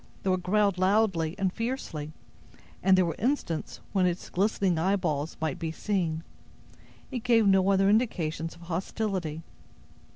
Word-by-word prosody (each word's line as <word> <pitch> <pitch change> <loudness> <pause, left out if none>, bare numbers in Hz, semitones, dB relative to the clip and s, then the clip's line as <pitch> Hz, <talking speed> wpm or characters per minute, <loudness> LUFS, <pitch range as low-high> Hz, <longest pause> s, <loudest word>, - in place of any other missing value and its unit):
Though 190 - +2
it 185 - -1
growled 200 0 +2
loudly 190 -4 +2
and 190 -2 0
fiercely, 230 - -4 0.7
and 190 0 +5
there 185 - +4
were 165 - -1
instants 225 - -2
when 185 -2 +3
its 175 0 -3
glistening 190 -3 +1
eyeballs 165 -5 0
might 155 -3 -2
be 165 -1 -2
seen, 165 -3 -1 0.9
it 255 - -2
gave 230 -2 +3
no 195 -1 +4
other 195 0 +4
indications 170 -8 0
of 170 - -17
hostility. 175 -2 -3
185 Hz, 140 wpm, -28 LUFS, 165-205 Hz, 0.9 s, and